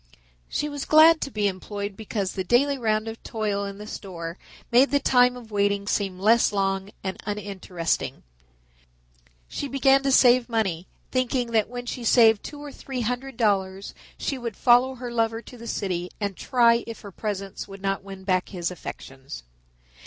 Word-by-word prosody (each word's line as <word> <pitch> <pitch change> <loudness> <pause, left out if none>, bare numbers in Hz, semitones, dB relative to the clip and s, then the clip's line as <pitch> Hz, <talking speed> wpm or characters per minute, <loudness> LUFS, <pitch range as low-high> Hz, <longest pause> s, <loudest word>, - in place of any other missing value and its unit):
She 300 - -1
was 290 -2 -5
glad 315 +1 +7
to - - -2
be 210 -5 0
employed 200 +1 -4
because 205 -2 -3
the 190 - -3
daily 275 +9 +3
round 215 -1 0
of 225 0 -7
toil 210 -3 -2
in 200 0 -6
the 210 - -8
store 175 -5 -7 0.3
made 250 +4 +6
the 285 - +2
time 250 -2 +4
of 230 -3 -12
waiting 200 -1 +1
seem 195 -2 -1
less 220 +5 +4
long 195 -1 -1
and 190 -1 -4
uninteresting. 195 -5 -3 1.2
She 285 - -4
began 270 0 +4
to 275 0 0
save 250 -1 +5
money, 190 -7 -1 0.2
thinking 255 -1 0
that 220 -2 +2
when 245 0 -6
she 245 - -5
had 235 - -2
saved 225 -3 +5
two 295 - -8
or 290 - -7
three 265 -2 -5
hundred 250 +3 -3
dollars 195 -4 0 0.2
she 275 - -3
would 235 -4 -5
follow 250 +2 +4
her 245 -1 -6
lover 225 -1 0
to - - -12
the 235 -1 -10
city 180 -5 -2
and 200 -2 -2
try 235 -1 +3
if 230 - -7
her 200 - -10
presence 200 -1 -5
would 195 -1 -11
not 195 0 -1
win 195 -1 -10
back 185 -1 0
his 175 -3 -3
affections. 135 - -9
215 Hz, 180 wpm, -25 LUFS, 195-245 Hz, 1.2 s, glad